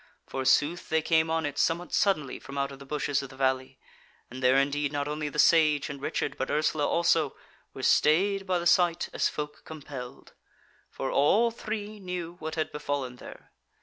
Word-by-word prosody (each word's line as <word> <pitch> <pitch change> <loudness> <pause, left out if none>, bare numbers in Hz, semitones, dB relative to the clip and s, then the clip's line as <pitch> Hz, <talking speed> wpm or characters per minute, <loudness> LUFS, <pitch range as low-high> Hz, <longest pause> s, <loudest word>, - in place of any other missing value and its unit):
Forsooth 145 +5 +1
they 160 0 +1
came 160 0 +2
on 160 -1 0
it 145 -1 -3
somewhat 170 +2 0
suddenly 155 -9 +1
from 140 0 -9
out 140 0 -1
of 135 - -11
the 140 - -12
bushes 145 -1 -1
of 135 - -8
the 130 - -13
valley; 130 0 -1 0.5
and 130 +1 -8
there 130 +1 +4
indeed 140 +1 +1
not 145 -1 -2
only 150 0 -3
the 150 - -8
Sage 150 -3 +4
and 140 -1 -8
Richard, 145 - -2
but 130 - -2
Ursula 150 -1 +1
also, 165 -4 +2 0.4
were - - -7
stayed 195 +5 +3
by 185 -1 +2
the 175 - -4
sight 175 -1 +3
as - - +1
folk 150 0 -6
compelled; 140 -5 -9 0.6
for 135 - -4
all 215 +12 +3
three 215 -1 -5
knew 180 -3 -5
what 160 0 -5
had 160 -1 -2
befallen 145 -4 -3
there. - - -12
150 Hz, 185 wpm, -28 LUFS, 140-170 Hz, 0.6 s, there